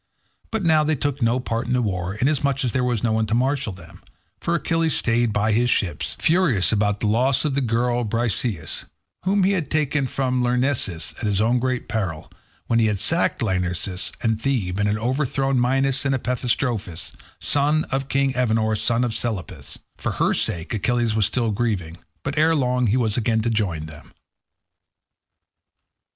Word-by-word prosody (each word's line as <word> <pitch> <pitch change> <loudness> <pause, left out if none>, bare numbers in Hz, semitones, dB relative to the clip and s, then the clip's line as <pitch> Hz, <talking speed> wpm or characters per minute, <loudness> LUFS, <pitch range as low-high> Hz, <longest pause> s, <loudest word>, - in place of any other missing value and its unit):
But 220 -3 -2
they - - +1
now 155 -1 +5
took 145 -2 -1
no 115 +2 +2
part 115 -2 -3
in 125 - 0
the 125 - +2
war, 95 -2 -2
inasmuch 140 +2 +1
as 120 - 0
there 125 - 0
was 120 -4 0
no 115 - +2
one 110 0 +1
to 110 - 0
marshal 130 -2 0
them; 90 -3 -13 0.4
for 170 - -1
Achilles 165 0 0
stayed 115 0 +1
by 105 +1 +1
his 120 +3 +2
ships, 95 -7 -1
furious 160 - +3
about 105 -1 +1
the - - -1
loss 125 +7 +2
of 150 - 0
the 140 - +1
girl 120 0 0
Briseis, 110 - -1 0.4
whom 195 +1 +2
he 190 - +3
had 180 -6 -1
taken 150 -3 0
from 130 0 -1
Lyrnessus 125 -9 0
at 115 - -2
his 100 -2 +1
own 115 +3 +2
great 130 0 -2
peril, 95 -9 -3 0.3
when 115 - +2
he 110 - +3
had 105 -2 0
sacked 165 - +1
Lyrnessus 90 -1 -2
and 110 -1 0
Thebe, 105 -9 -1
and 100 - +2
had 105 +1 +1
overthrown 135 +2 0
Mynes 135 +2 +1
and 140 -1 +1
Epistrophus, 120 -8 -2 0.3
sons 150 +2 +2
of 135 0 -1
king 135 -1 +1
Evenor, 110 -3 +1
son 115 +3 +1
of 120 -2 -1
Selepus. 110 -6 -5 0.2
For - - -3
her - - +1
sake 85 -1 -1
Achilles 115 +2 0
was 110 -2 +2
still 115 -3 0
grieving, 100 -7 -2 0.3
but 140 +2 -2
ere 160 +1 +4
long 125 -3 +1
he 110 +5 +2
was 110 -3 0
again 110 -1 +1
to 115 - 0
join 90 -8 -1
them. 80 -1 -13
120 Hz, 180 wpm, -22 LUFS, 105-135 Hz, 0.4 s, now